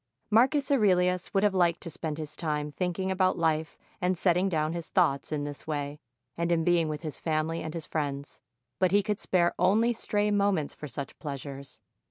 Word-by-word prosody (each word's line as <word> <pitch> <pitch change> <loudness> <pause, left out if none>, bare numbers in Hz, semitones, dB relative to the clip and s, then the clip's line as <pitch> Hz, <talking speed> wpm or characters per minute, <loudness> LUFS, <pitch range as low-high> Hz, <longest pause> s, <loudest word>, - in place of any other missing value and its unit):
Marcus 265 +5 +4
Aurelius 180 -7 +3
would 195 0 +2
have 205 -2 +3
liked 175 -2 +2
to 170 - -6
spend 155 -1 -4
his 155 -1 -6
time 150 -2 -2
thinking 185 +3 -2
about 185 0 +2
life 160 -1 0 0.2
and 180 0 +1
setting 180 +1 +2
down 155 -2 0
his 170 -1 -5
thoughts 155 -7 +1
in 150 -2 -1
this 145 +1 -7
way 145 -1 -3 0.4
and 170 0 -1
in 165 -1 +2
being 170 -1 +3
with 150 +1 -5
his 155 -2 -5
family 160 +1 -1
and 155 +1 -5
his 165 - -4
friends; 145 -2 -4 0.4
but 185 - +4
he 205 +1 +4
could 210 0 -1
spare 175 -2 +2
only 215 +7 +4
stray 210 -2 0
moments 200 -7 +1
for 150 - -8
such 140 +1 -7
pleasures. 140 -2 -7
170 Hz, 195 wpm, -28 LUFS, 150-190 Hz, 0.4 s, Marcus